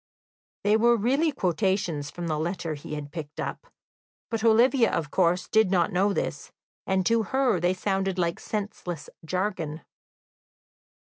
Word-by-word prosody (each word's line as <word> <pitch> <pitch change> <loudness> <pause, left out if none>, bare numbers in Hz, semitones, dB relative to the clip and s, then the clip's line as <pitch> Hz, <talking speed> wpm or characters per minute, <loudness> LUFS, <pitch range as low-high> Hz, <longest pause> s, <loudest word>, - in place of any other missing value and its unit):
They 210 +1 +4
were 235 +1 +4
really 275 +9 +2
quotations 180 - 0
from 175 +2 -6
the 155 -2 -1
letter 170 0 -2
he 150 +1 -6
had 145 -1 -6
picked 155 -3 -7
up, - - -4 0.6
but 225 -1 -2
Olivia, 235 +2 +5
of 150 -3 -2
course, 180 0 +2
did 220 -3 +3
not 180 -3 +2
know 195 +3 +3
this, - - -3 0.4
and 190 -1 +1
to 230 +2 +3
her 255 -2 +1
they 175 +2 +1
sounded 195 0 -1
like 170 -2 0
senseless 195 -6 -5
jargon. 170 -3 -2
190 Hz, 145 wpm, -26 LUFS, 170-220 Hz, 0.6 s, Olivia